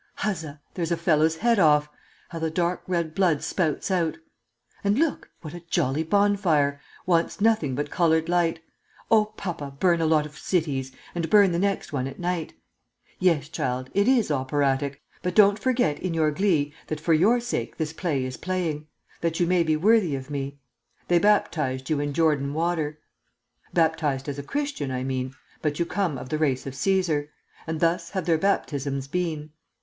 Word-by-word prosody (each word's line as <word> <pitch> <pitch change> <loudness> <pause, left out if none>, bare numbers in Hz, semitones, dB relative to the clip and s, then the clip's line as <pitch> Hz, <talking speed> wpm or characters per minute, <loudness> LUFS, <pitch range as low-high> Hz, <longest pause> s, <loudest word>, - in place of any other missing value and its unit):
Huzza! 160 -8 -3
there's 170 -2 -2
a 170 - +1
fellow's 160 -1 +2
head 230 +5 +2
off, 150 -3 +5 0.4
How 165 - -6
the 160 0 -1
dark 175 +2 -1
red 170 -3 -1
blood 170 -6 +2
spouts 170 +1 -1
out! 170 -3 0 0.7
And 200 +2 +2
look, 320 0 0
what 155 -2 -8
a 175 - -7
jolly 155 -4 0
bonfire! 165 -6 +2 0.2
Wants 170 +2 +1
nothing 205 - +2
but 145 +1 -3
colored 160 -2 +2
light! 170 -2 +1 0.5
Oh, 215 -1 +6
papa, 175 -10 -6
burn 175 -3 +3
a 160 - +2
lot 155 -1 +3
of 150 0 -11
cities, 140 -7 -1 0.2
And 170 -2 -2
burn 200 -2 +6
the 170 - 0
next 200 -4 -1
one 130 -2 -1
at 135 - -8
night!' 175 -2 -2 0.6
"'Yes, 165 -6 +2
child, 130 -4 -3
it 200 +2 +2
is 245 -10 +3
operatic; 140 0 0 0.2
But 180 - -2
don't 205 0 +6
forget, 245 - +1
in 180 -3 -3
your 155 -1 +2
glee, 150 -4 +1
That 155 - -3
for 165 +2 +2
your 205 +10 +4
sake 240 0 -3
this 160 -1 -2
play 150 -6 -1
is 130 0 -5
playing, 165 -5 -2 0.3
That 165 -1 -1
you 175 - +3
may 180 0 +3
be 160 -2 +2
worthy 195 -3 +3
of 135 +1 -7
me. 140 0 -4 0.5
They 175 -1 +5
baptized 150 -9 +1
you 150 - +2
in 145 0 -2
Jordan 145 -2 +1
water, 160 -2 -1 0.7
Baptized 155 -5 +1
as 140 -1 -4
a - - -2
Christian, 280 - -3
I 130 -1 -2
mean, 130 0 -3 0.3
But 150 -1 -1
you 170 - +1
come 175 -5 -1
of 125 0 -8
the 155 - -1
race 135 -5 0
of 135 - -5
Cæsar, 160 -1 +1 0.4
And 160 -1 -2
thus 170 +1 +1
have 190 -2 -3
their 165 -3 +2
baptisms 140 -7 -1
been. 155 -2 -3
160 Hz, 180 wpm, -25 LUFS, 145-180 Hz, 0.7 s, Oh